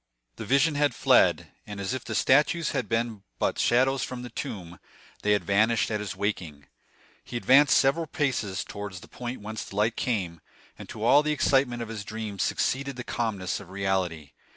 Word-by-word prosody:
The - - -6
vision 140 +6 +3
had 145 0 +1
fled; - - +3 0.2
and 105 -1 -7
as 100 +4 -2
if 130 - -4
the 110 0 -5
statues 150 +6 +3
had 115 - -2
been 115 -2 -1 0.2
but - - -1
shadows 130 +2 +3
from 125 -1 -5
the 125 - -8
tomb, 90 -7 -6 0.4
they 105 - +3
had 105 - +1
vanished 110 +3 +2
at 105 - -1
his 105 -2 -5
waking. 85 -8 -3 0.6
He 120 - -5
advanced 135 +4 +5
several 150 +5 +2
paces 130 - -1
towards 100 -3 -7
the - - -13
point 120 -1 -6
whence 110 +1 -5
the - - -11
light 110 +3 +1
came, 90 -9 -2 0.3
and - - -11
to 110 - -7
all 140 +5 +6
the 150 0 -1
excitement 130 -4 +2
of 115 - -9
his 110 -2 -5
dream 110 -2 -6
succeeded 140 +6 0
the 125 - -6
calmness 100 -8 -2
of 100 -3 -12
reality. 95 -6 -2
110 Hz, 190 wpm, -27 LUFS, 100-130 Hz, 0.6 s, all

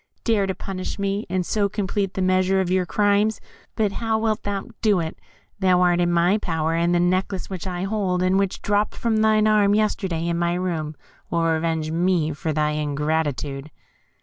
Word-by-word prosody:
Dare 215 -4 +2
to 190 - -2
punish 185 -1 -5
me, 200 +1 -2
and 180 0 -1
so 205 +1 0
complete 200 -1 -2
the 190 - 0
measure 185 +1 +2
of 185 -1 0
your 185 -1 +1
crimes! 205 +2 +2 0.4
But 210 -2 +1
how 225 +2 -1
wilt 220 -1 0
thou 200 -1 -4
do 210 -4 +3
it? 160 -1 -4 0.4
Thou 185 -2 +3
art 175 -1 +3
in 175 0 +2
my 175 +5 +3
power, 160 -4 -1
and 170 +1 +1
the - - +3
necklace 185 +2 0
which 190 0 -5
I 180 0 -3
hold, 195 -3 0
and 185 +1 +3
which 195 -1 -2
dropped 205 +1 +1
from 230 -2 0
thine 215 0 +3
arm 210 -1 +4
yesterday 190 -6 0
in 170 0 -1
my 170 0 +1
room, 165 -4 -3 0.3
will 170 -1 0
revenge 160 -1 0
me 170 -2 +1
for 155 +2 -3
thy 150 0 +1
ingratitude." 150 -1 -2
185 Hz, 190 wpm, -23 LUFS, 165-200 Hz, 0.4 s, arm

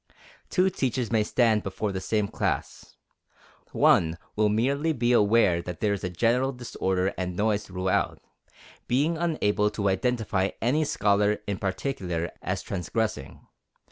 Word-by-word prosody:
Two 190 +1 +2
teachers 130 - -1
may 110 -2 +3
stand 110 0 +2
before 100 +2 -3
the 95 -1 -4
same 105 -1 0
class. - - -3 0.8
One 80 0 +3 0.2
will 105 0 +3
merely 140 +9 +1
be 120 -3 +1
aware 105 -6 +4
that 90 -1 -7
there 105 -2 +1
is 100 - -5
a 90 - -1
general 120 +8 +1
disorder 95 -7 -2
and 90 -1 -3
noise 105 +1 0
throughout, 95 0 -1 0.7
being 145 +7 +1
unable 130 -12 +1
to 100 -1 -1
identify 100 -2 0
any 145 +7 +1
scholar 105 -4 +2
in 100 -2 -3
particular 95 -5 -3
as - - -3
transgressing. 95 -5 -3
105 Hz, 140 wpm, -26 LUFS, 95-125 Hz, 0.8 s, aware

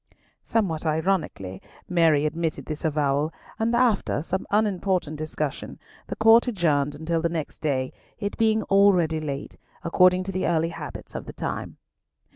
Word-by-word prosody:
Somewhat 185 -9 -1
ironically 155 - -1 0.3
Mary 165 -4 +3
admitted 155 -3 -2
this 155 - -4
disavowal, 150 -1 0 0.3
and 230 +1 +1
after 235 - +2
some 185 +3 -3
unimportant 190 -6 0
discussion, 155 -2 -4 0.3
the - - -4
Court 225 +2 +6
adjourned 150 - +1
until 160 +2 -1
the 170 - +1
next 165 -3 -4
day, 130 -4 -1 0.2
it 205 -1 -3
being 220 -1 +2
already 185 -6 +4
late, 140 -2 -5 0.3
according 180 +2 +4
to 195 - -4
the 185 0 -1
early 165 -1 +1
habits 170 - -8
of - - -6
the - - -7
time. - - -5
165 Hz, 145 wpm, -25 LUFS, 155-195 Hz, 0.3 s, Court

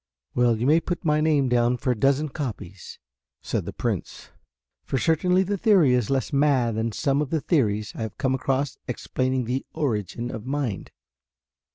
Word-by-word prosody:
"Well, 120 -2 +3
you 115 - -2
may 155 +4 +5
put 175 +1 -4
my 150 -1 +3
name 150 -4 +2
down 120 0 +2
for 125 - 0
a - - 0
dozen 140 +6 +2
copies," 105 - -6 0.5
said - - -2
the - - -5
Prince, - - -4 0.5
"for 135 - -2
certainly 180 +5 +2
the 200 +1 -2
theory 190 - +5
is 125 -4 +1
less 135 +2 -1
mad 135 -5 +3
than 110 +1 -1
some 140 +5 0
of 150 - -2
the 160 - 0
theories 110 - 0
I - - -6
have 110 -2 -5
come 130 -1 0
across 135 +1 -1
explaining 130 +1 -1
the 125 +3 -2
origin 120 - -2
of 110 - -6
mind." 135 -5 -3
130 Hz, 180 wpm, -25 LUFS, 120-150 Hz, 0.5 s, may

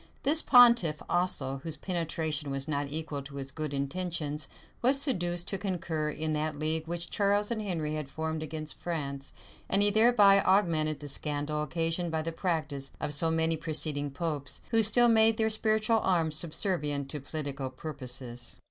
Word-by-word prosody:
This 305 +3 +3
pontiff 235 - +6
also, 150 -7 0
whose 160 +2 -3
penetration 160 -4 -2
was 135 +1 -3
not 145 -2 -1
equal 155 -1 -4
to 140 +1 -11
his 135 -1 -5
good 155 +1 -4
intentions, 150 +1 -2 0.3
was 265 +3 +4
seduced 175 - 0
to 195 - -2
concur 170 -6 -2
in 155 +1 -3
that 150 0 -2
league 155 +1 -1
which 170 0 -3
Charles 205 +1 +1
and 225 -2 -2
Henry 165 -7 -2
had 155 -3 -4
formed 160 +1 -3
against 155 0 -5
France;[*] 140 -5 -4 0.4
and 195 +1 +4
he 205 - +5
thereby 210 -3 +5
augmented 165 -7 +2
the 145 - -7
scandal 150 +1 -2
occasioned 165 +3 -1
by 160 -1 -2
the 165 - -3
practice 155 -5 -3
of 145 - -2
so 165 +3 +2
many 160 0 +2
preceding 155 -2 -1
popes, 145 -1 -4
who 225 -1 +5
still 240 +3 +5
made 225 -1 +5
their 220 0 +1
spiritual 220 +1 +2
arms 165 -6 +1
subservient 155 -4 0
to 150 - -4
political 140 -2 -4
purposes. 130 -3 -4
160 Hz, 165 wpm, -29 LUFS, 150-185 Hz, 0.4 s, pontiff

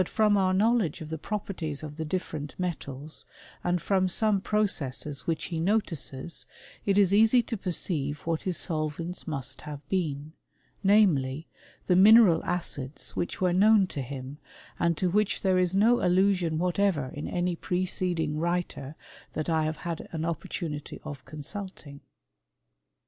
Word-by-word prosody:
om 215 -1 +5
our 190 -2 +3
knowledge 205 -4 +2
of 155 -2 -8
the 160 - -2
properties 170 -7 -4
of 150 -1 -7
the 160 - -2
different; 155 -3 -4
metals, 155 -5 -4 0.4
and 175 0 +1
from 190 -2 +2
some 210 +1 +3
processes 150 -10 0
which 160 -1 -1
he 165 - -1
notices, 170 -6 -1 0.4
^it 200 0 +3
is 200 -2 +4
easy 225 +4 +5
to 230 - -4
perceive 160 -7 -2
what 165 -1 -1
his 185 -3 -1
solvents 165 +2 -3
must 135 -4 -4
have 150 -2 -7
beeal^ 155 -5 -1 0.5
namely, 165 -9 +3 0.4
the 180 - +3
mineral 195 -3 +7
acids 145 -6 -3
which 175 - -3
were 180 -2 +2
known 205 +2 +5
to 150 -6 -5
hxmf 135 +1 -7 0.4
and 170 -2 +2
to 185 - +1
wliich 210 +1 +1
there 185 -1 +3
is 180 0 +2
no 230 +5 +4
allusion 180 -3 +2
whatever 180 -5 +1
in 145 - -5
aay* 175 -1 -1
preceding 180 -4 -1
writer 170 -4 -2 0.4
that 155 +2 -3
I 160 -1 +2
have 155 0 -2
had 170 -1 -5
an 160 -1 -3
opportunity 160 -2 -4
<wt 140 -3 -7
consulting. 155 -2 -7
175 Hz, 150 wpm, -28 LUFS, 150-190 Hz, 0.5 s, mineral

